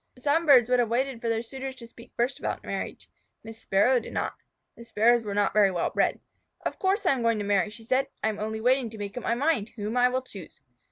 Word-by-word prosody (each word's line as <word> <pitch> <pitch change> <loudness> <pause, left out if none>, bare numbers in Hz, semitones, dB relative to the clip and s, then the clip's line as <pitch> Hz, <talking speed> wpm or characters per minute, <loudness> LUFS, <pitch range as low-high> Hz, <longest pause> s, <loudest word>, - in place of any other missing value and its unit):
Some 295 +6 +1
birds 255 -5 +7
would 250 0 +2
have 235 -2 +1
waited 250 0 -1
for 230 - -2
their 225 0 0
suitors 265 +2 -7
to 240 - -9
speak 235 0 -15
first 240 +3 0
about - - -4
marriage. - - -5 0.4
Miss 225 0 -10
Sparrow 245 +7 +3
did 225 - -10
not. - - -2 0.4
The 235 - -12
Sparrows 235 +1 +3
are 205 -2 -4
not 205 -1 +1
very 210 -2 +5
well 175 -3 -1
bred. - - +1 0.5
"Of - - -3
course 395 +2 0
I - - +4
am 265 -3 0
going 230 -1 +2
to 205 - -3
marry," 200 -1 +2
she 220 +2 -12
said. 260 +4 +1 0.2
"I 220 - +2
am 215 - -5
only 220 +1 -3
waiting 250 0 +2
to 220 - -10
make 205 -1 -6
up 250 - -4
my 235 - 0
mind 260 -5 0
whom 215 +1 -4
I 250 0 +5
will 255 +1 -2
choose." 195 -9 -11
235 Hz, 255 wpm, -27 LUFS, 215-260 Hz, 0.5 s, birds